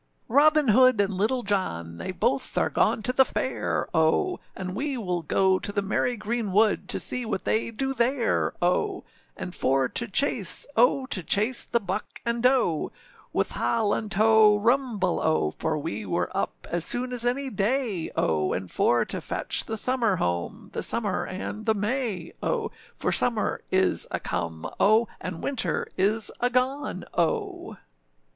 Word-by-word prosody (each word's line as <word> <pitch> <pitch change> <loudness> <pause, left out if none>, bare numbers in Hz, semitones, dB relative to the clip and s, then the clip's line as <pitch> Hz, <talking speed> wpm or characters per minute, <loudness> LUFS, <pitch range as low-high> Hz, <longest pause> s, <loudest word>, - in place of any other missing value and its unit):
â] 225 - -11
ROBIN 300 -2 +5
HOOD 255 +1 +5
and 200 0 +2
Little 220 +7 +1
John, 85 - -2
They 185 - -4
both 255 +9 -1
are - - +1
gone 220 - +1
to 250 - +1
the 265 - +6
fair, 260 0 -2
O! 160 - +2 0.2
And 185 -1 -5
we 275 +3 -2
will 180 -6 -2
go 190 +4 +2
to - - -4
the 200 0 -1
merry 240 +5 0
green 215 0 -3
wood, 210 +2 +2
To - - 0
see 250 - 0
what 210 -5 -4
they 220 - +1
do 265 +4 -2
there, 240 0 +1
O! 370 - 0 0.3
And 180 - -6
for 135 -3 +1
to 235 - -2
chase, 210 -3 +1
O! 250 +3 +3
To 195 - -2
chase 215 +8 +2
the 235 - +1
buck 190 -3 -5
and 235 0 -1
doe. 250 - +2 0.4
With - - -1
ha 230 -1 0
lan 210 +1 -1
tow, 215 0 +5
rumble, 225 -4 +1
O! 155 - +1
For - - -1
we - - -4
were - - -2
up - - -3
as 175 -1 -1
soon 250 +6 -1
as 240 -1 0
any 260 +2 0
day, 210 -3 0
O! 75 -2 0
And 95 0 -5
for - - +2
to - - -4
fetch - - -3
the 220 - -3
summer 235 -3 +3
home, 85 - -3
The - - -3
summer 205 -5 0
and 205 +4 -6
the 220 - +3
may, 210 -4 -2
O! 445 -3 -1 0.2
For - - -1
summer 230 -3 +1
is 190 0 +3
a - - -3
come, 85 -2 -4
O! 220 +3 +4
And 180 -2 -6
winter 275 -4 -1
is 210 +4 +1
a 245 - +2
gone, 255 -4 -1
O! 170 -2 -2
220 Hz, 175 wpm, -26 LUFS, 185-250 Hz, 0.4 s, the